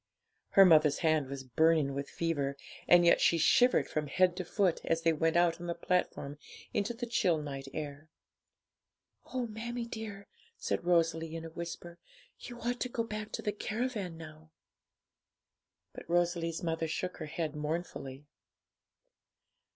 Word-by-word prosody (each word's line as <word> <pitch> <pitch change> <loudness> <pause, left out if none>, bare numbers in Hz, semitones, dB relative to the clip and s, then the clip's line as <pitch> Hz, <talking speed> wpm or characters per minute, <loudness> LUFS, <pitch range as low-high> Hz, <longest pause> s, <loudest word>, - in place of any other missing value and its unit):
Her 195 - +9
mother's 155 -4 +5
hand 155 -3 +3
was 135 0 -6
burning 155 +2 +2
with 140 +1 -4
fever, 145 -5 -2 0.3
and 175 0 +7
yet 170 - +5
she 170 - +4
shivered 245 +10 +4
from 150 -1 -2
head 180 +5 +3
to 185 - -2
foot 180 0 +1
as 165 0 0
they 165 -1 +4
went 160 +1 +1
out 175 -1 +2
on 175 - -5
the 170 - -2
platform 170 -5 -1 0.3
into 215 +4 -1
the 240 +1 -4
chill 185 -8 +2
night 135 -2 -6
air. 150 0 -6 1.2
'Oh, 255 -1 -1
mammie 235 +2 -5
dear,' 220 -3 -7 0.3
said - - -2
Rosalie, 165 -2 +1
in 165 0 -6
a 165 - -8
whisper, 170 0 -7 0.4
'you 240 -1 -9
ought 245 +1 -2
to 250 - -2
go 235 -1 -1
back 215 -1 -6
to - - -4
the 210 - 0
caravan 215 -4 -3
now.' 155 -1 -12 1.4
But - - -11
Rosalie's 170 0 0
mother 165 -1 -1
shook 180 +3 -3
her 155 - -6
head 155 0 -3
mournfully. 150 -3 -4
170 Hz, 155 wpm, -32 LUFS, 155-195 Hz, 1.4 s, Her